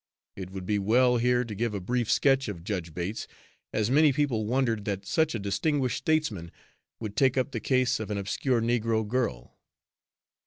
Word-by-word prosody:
It 95 Hz, -2 st, -7 dB
would 95 Hz, -1 st, -7 dB
be 105 Hz, +1 st, 0 dB
well 125 Hz, +5 st, +3 dB
here 125 Hz, +1 st, +2 dB
to 110 Hz, -, -6 dB
give 110 Hz, +1 st, -2 dB
a -, -, -2 dB
brief 120 Hz, +4 st, -1 dB
sketch 135 Hz, -1 st, +3 dB
of 90 Hz, -5 st, -6 dB
Judge 90 Hz, -4 st, -3 dB
Bates, 90 Hz, +6 st, -4 dB, 0.4 s
as 110 Hz, +2 st, 0 dB
many 150 Hz, +2 st, +5 dB
people 130 Hz, -7 st, 0 dB
wondered 115 Hz, -3 st, 0 dB
that 100 Hz, -1 st, -3 dB
such 160 Hz, +4 st, +1 dB
a -, -, -2 dB
distinguished 130 Hz, +6 st, 0 dB
statesman 135 Hz, -, 0 dB, 0.5 s
would 105 Hz, -3 st, -6 dB
take 135 Hz, -1 st, +3 dB
up 130 Hz, +2 st, 0 dB
the -, -, -3 dB
case 130 Hz, -2 st, +1 dB
of 110 Hz, -, -5 dB
an 105 Hz, -, -2 dB
obscure 115 Hz, +5 st, 0 dB
negro 115 Hz, -2 st, 0 dB
girl. 110 Hz, -, -3 dB
115 Hz, 185 wpm, -28 LUFS, 100-130 Hz, 0.5 s, many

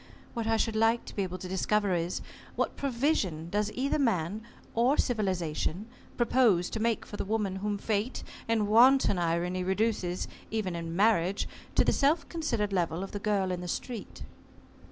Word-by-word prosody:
What 230 Hz, -2 st, -2 dB
I 225 Hz, 0 st, +3 dB
should 225 Hz, 0 st, 0 dB
like 225 Hz, +2 st, +2 dB
to -, -, -10 dB
be 200 Hz, -, 0 dB
able 185 Hz, -1 st, -3 dB
to 185 Hz, -, -7 dB
discover 195 Hz, +2 st, +1 dB
is 170 Hz, +1 st, -1 dB, 0.3 s
what -, -, -1 dB
provision 235 Hz, -, 0 dB
does 210 Hz, +1 st, 0 dB
either 275 Hz, +4 st, 0 dB
man 210 Hz, -, 0 dB, 0.3 s
or 245 Hz, +5 st, +3 dB
civilization 185 Hz, -, -1 dB, 0.3 s
propose 230 Hz, -7 st, +3 dB
to 225 Hz, -, -3 dB
make 230 Hz, 0 st, 0 dB
for 205 Hz, -, -8 dB
the -, -, -2 dB
woman 205 Hz, -2 st, -1 dB
whom 205 Hz, +1 st, -2 dB
Fate, 215 Hz, +4 st, -2 dB, 0.2 s
in 225 Hz, -2 st, +2 dB
wanton 235 Hz, -1 st, +5 dB
irony, 175 Hz, +2 st, 0 dB
reduces, 190 Hz, -2 st, 0 dB, 0.2 s
even 210 Hz, -5 st, -2 dB
in 165 Hz, 0 st, -4 dB
marriage, 195 Hz, -2 st, +2 dB, 0.3 s
to -, -, +5 dB
the -, -, +3 dB
self 310 Hz, +4 st, +2 dB
considered 235 Hz, -, -1 dB
level 175 Hz, -1 st, 0 dB
of 195 Hz, -, -7 dB
the 205 Hz, -, -4 dB
girl 200 Hz, -2 st, 0 dB
in 180 Hz, -1 st, -3 dB
the 180 Hz, -, -5 dB
street?" 230 Hz, +5 st, -5 dB
205 Hz, 175 wpm, -29 LUFS, 180-230 Hz, 0.3 s, wanton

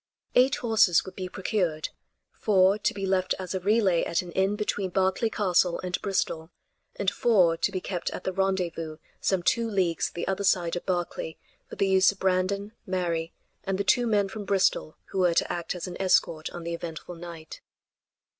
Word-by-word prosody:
Eight 255 Hz, +2 st, +5 dB
horses 220 Hz, -8 st, +3 dB
would 190 Hz, -, -9 dB
be 185 Hz, -1 st, -5 dB
procured; 180 Hz, -5 st, -1 dB, 0.4 s
four 195 Hz, -1 st, +3 dB
to -, -, +1 dB
be 195 Hz, -1 st, -4 dB
left 185 Hz, -1 st, +1 dB
as 185 Hz, -1 st, -5 dB
a 190 Hz, -, -1 dB
relay 195 Hz, -3 st, +3 dB
at 170 Hz, -, 0 dB
an 175 Hz, -, -9 dB
inn 190 Hz, +3 st, +1 dB
between 205 Hz, -2 st, -2 dB
Berkeley 190 Hz, +4 st, +1 dB
Castle 180 Hz, -4 st, +2 dB
and 180 Hz, -1 st, -3 dB
Bristol, 165 Hz, -4 st, -1 dB, 0.5 s
and 200 Hz, -1 st, 0 dB
four 185 Hz, -8 st, +3 dB
to 170 Hz, +5 st, 0 dB
be 190 Hz, -, -2 dB
kept 180 Hz, -1 st, -3 dB
at -, -, -7 dB
the 190 Hz, -, -2 dB
rendezvous 180 Hz, -5 st, -1 dB, 0.2 s
some 190 Hz, -3 st, 0 dB
two 230 Hz, +5 st, +1 dB
leagues 185 Hz, -5 st, 0 dB
the 170 Hz, -, -5 dB
other 195 Hz, +1 st, -1 dB
side 175 Hz, -3 st, +2 dB
of 175 Hz, -, -6 dB
Berkeley 175 Hz, -3 st, -2 dB, 0.3 s
for -, -, -8 dB
the 195 Hz, -, +1 dB
use 190 Hz, 0 st, +5 dB
of 200 Hz, -, -14 dB
Brandon, 190 Hz, +2 st, 0 dB, 0.2 s
Mary 170 Hz, -3 st, -1 dB, 0.3 s
and 195 Hz, -1 st, -1 dB
the 200 Hz, -, 0 dB
two 240 Hz, +4 st, +3 dB
men 205 Hz, -3 st, +2 dB
from 205 Hz, +2 st, -7 dB
Bristol 190 Hz, -5 st, +1 dB
who 190 Hz, -, -2 dB
were 175 Hz, -2 st, +3 dB
to -, -, +1 dB
act 175 Hz, +1 st, -3 dB
as 180 Hz, -, -5 dB
an 180 Hz, 0 st, -6 dB
escort 170 Hz, -4 st, +2 dB
on 175 Hz, -, -8 dB
the 170 Hz, 0 st, -3 dB
eventful 170 Hz, +1 st, -6 dB
night. 165 Hz, -2 st, -9 dB
185 Hz, 190 wpm, -27 LUFS, 175-195 Hz, 0.5 s, Eight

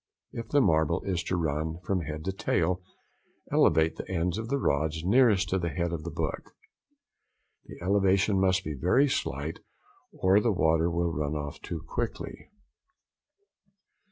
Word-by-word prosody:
If 115 Hz, -1 st, -6 dB
the 145 Hz, +4 st, +3 dB
marble 80 Hz, -, +2 dB
is 90 Hz, -3 st, -1 dB
to 90 Hz, -, -1 dB
run 80 Hz, 0 st, -1 dB
from 95 Hz, -1 st, 0 dB
head 75 Hz, 0 st, -6 dB
to 95 Hz, -, 0 dB
tail, 90 Hz, -1 st, 0 dB, 0.7 s
elevate 80 Hz, 0 st, +3 dB
the -, -, -7 dB
ends 90 Hz, +2 st, -1 dB
of 115 Hz, -, -5 dB
the 140 Hz, -, +1 dB
rods 80 Hz, -, 0 dB
nearest 105 Hz, -2 st, +4 dB
to 95 Hz, -, +1 dB
the 85 Hz, -1 st, -1 dB
head 85 Hz, +3 st, -2 dB
of 85 Hz, -, -3 dB
the 85 Hz, -, -4 dB
book. 75 Hz, -, -4 dB, 1.1 s
The -, -, -11 dB
elevation 95 Hz, +1 st, +3 dB
must 95 Hz, 0 st, +2 dB
be 75 Hz, -, -4 dB
very 90 Hz, -, +3 dB
slight 75 Hz, -, -2 dB, 0.5 s
or 95 Hz, +2 st, +3 dB
the 115 Hz, +2 st, +1 dB
water 80 Hz, -2 st, +2 dB
will 85 Hz, 0 st, -1 dB
run 75 Hz, 0 st, -2 dB
off 75 Hz, -1 st, -5 dB
too 85 Hz, -2 st, -6 dB
quickly. -, -, -5 dB
85 Hz, 155 wpm, -28 LUFS, 80-95 Hz, 1.1 s, nearest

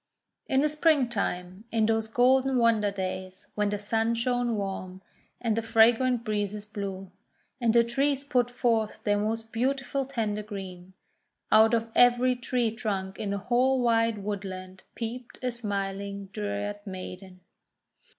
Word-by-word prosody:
In 265 Hz, -, +3 dB
the 300 Hz, -, +3 dB
Springtime, 235 Hz, -, 0 dB
in 225 Hz, -1 st, +2 dB
those 225 Hz, 0 st, +1 dB
golden 260 Hz, +3 st, +3 dB
wonder 230 Hz, -3 st, +3 dB
days 185 Hz, -1 st, -5 dB
when 210 Hz, -1 st, 0 dB
the 205 Hz, -, -1 dB
Sun 225 Hz, +3 st, 0 dB
shone 245 Hz, 0 st, 0 dB
warm, 190 Hz, -2 st, -5 dB, 0.4 s
and 230 Hz, -3 st, 0 dB
the 230 Hz, -, 0 dB
fra 225 Hz, +1 st, +6 dB
grant 245 Hz, 0 st, 0 dB
breezes 210 Hz, -2 st, -2 dB
blew, 195 Hz, -3 st, -6 dB, 0.5 s
and 235 Hz, -2 st, +3 dB
the 235 Hz, +1 st, +5 dB
trees 275 Hz, +4 st, 0 dB
put 250 Hz, -4 st, +1 dB
forth 230 Hz, -3 st, 0 dB
their 205 Hz, -1 st, +2 dB
most 225 Hz, +1 st, -3 dB
beautiful 270 Hz, +2 st, -1 dB
tender 215 Hz, -5 st, -2 dB
green, 190 Hz, -3 st, -8 dB, 0.6 s
out 220 Hz, +2 st, +6 dB
of 230 Hz, 0 st, -2 dB
every 245 Hz, +1 st, +5 dB
tree 245 Hz, -1 st, 0 dB
trunk 195 Hz, -4 st, -3 dB
in 205 Hz, -, -3 dB
the 200 Hz, -, -1 dB
whole 250 Hz, +5 st, +2 dB
wide 230 Hz, -2 st, +2 dB
woodland 190 Hz, -2 st, -5 dB
peeped 235 Hz, +1 st, -6 dB
a 250 Hz, -, 0 dB
smiling 200 Hz, -3 st, -4 dB
Dryad 205 Hz, 0 st, -3 dB
Maiden. 185 Hz, 0 st, -8 dB
220 Hz, 145 wpm, -28 LUFS, 200-245 Hz, 0.6 s, fra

